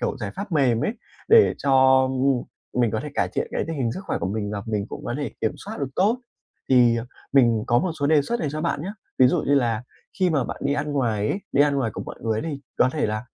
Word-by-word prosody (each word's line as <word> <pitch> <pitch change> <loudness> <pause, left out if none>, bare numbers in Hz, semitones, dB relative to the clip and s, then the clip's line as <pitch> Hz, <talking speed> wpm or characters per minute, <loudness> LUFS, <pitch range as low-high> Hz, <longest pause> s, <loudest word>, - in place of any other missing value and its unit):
kiểu, - - -1
giải 105 -6 -5
pháp 200 -3 -6
mềm 125 -6 +2
ấy 215 - 0 0.4
để 455 -1 +6
cho, 130 -1 +5
ưm, 130 - -3
ưm, 135 -3 +2 0.4
mình 115 -3 +3
có 110 - -2
thể 150 - -5
cải - - +1
thiện - - -2
cái - - -1
tình 165 - -4
hình 120 -4 -1
sức - - -6
khỏe - - -2
của - - -2
mình 105 +1 -3
và 100 -1 -4
mình 105 -2 -2
cũng - - -8
có - - -3
thể 145 -5 -3
kiểm 110 - 0
soát 215 +3 -8
được 140 - -1
tốt, 215 +7 +2 0.5
thì, 120 -3 +5
ờ, 115 - -3 0.3
mình 115 -5 +4
có 120 +1 +3
một 180 -3 -1
số 140 - +2
đề 150 -1 +4
xuất 235 +9 -2
này 150 - -1
cho 155 - -3
bạn 155 -3 -1
nhá. 195 +5 -4 0.3
Ví 130 - +7
dụ 125 - +1
như 140 - +3
là 115 -4 +1 0.4
khi 185 -2 +3
mà 140 -5 +1
bạn - - -5
đi 140 - +2
ăn 145 0 -2
ngoài 110 -6 0
ấy, - - -1
đi 140 - +5
ăn 145 -1 +2
ngoài 125 -5 0
cùng - - -5
mọi - - -8
người 110 -1 -1
đi 145 -4 -5 0.2
có 125 - +5
thể 155 - 0
là, 110 +2 -3
135 Hz, 280 wpm, -24 LUFS, 115-150 Hz, 0.5 s, Ví